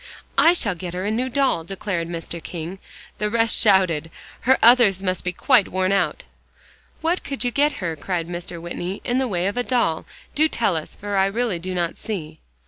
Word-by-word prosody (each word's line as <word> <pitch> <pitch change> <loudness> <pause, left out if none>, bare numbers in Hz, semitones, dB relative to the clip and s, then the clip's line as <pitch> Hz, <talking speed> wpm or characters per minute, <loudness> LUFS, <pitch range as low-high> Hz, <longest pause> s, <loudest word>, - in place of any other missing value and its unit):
"I 335 - +7
shall 225 - +1
get 175 0 -7
her 185 +2 -3
a 210 - 0
new 250 +4 -1
doll," 265 -10 +1
declared 185 -1 -3
Mr. 170 0 -5
King. 175 +3 -6 0.4
The 210 - 0
rest 225 0 +3
shouted. 185 -6 +3 0.3
"Her 265 +2 +4
others 225 -5 +6
must 185 -1 -1
be 180 - -1
quite 190 +2 +3
worn 185 +1 0
out." 200 - 0 0.8
"What 335 +3 0
could 275 -2 -3
you 245 - +1
get 290 +4 +2
her," 170 -3 -3
cried 165 +2 -3
Mr. 175 0 -6
Whitney, 175 +3 -5
"in 245 +1 0
the 265 - 0
way 180 -5 -1
of 200 +4 -1
a 245 - +1
doll? 240 -11 0 0.3
Do 310 +1 +3
tell 225 - +1
us, 155 -1 -5
for 205 0 -3
I 190 - +4
really 215 -3 -1
do 185 +2 -5
not 170 -1 -2
see." 160 -7 -5
190 Hz, 205 wpm, -22 LUFS, 175-235 Hz, 0.8 s, I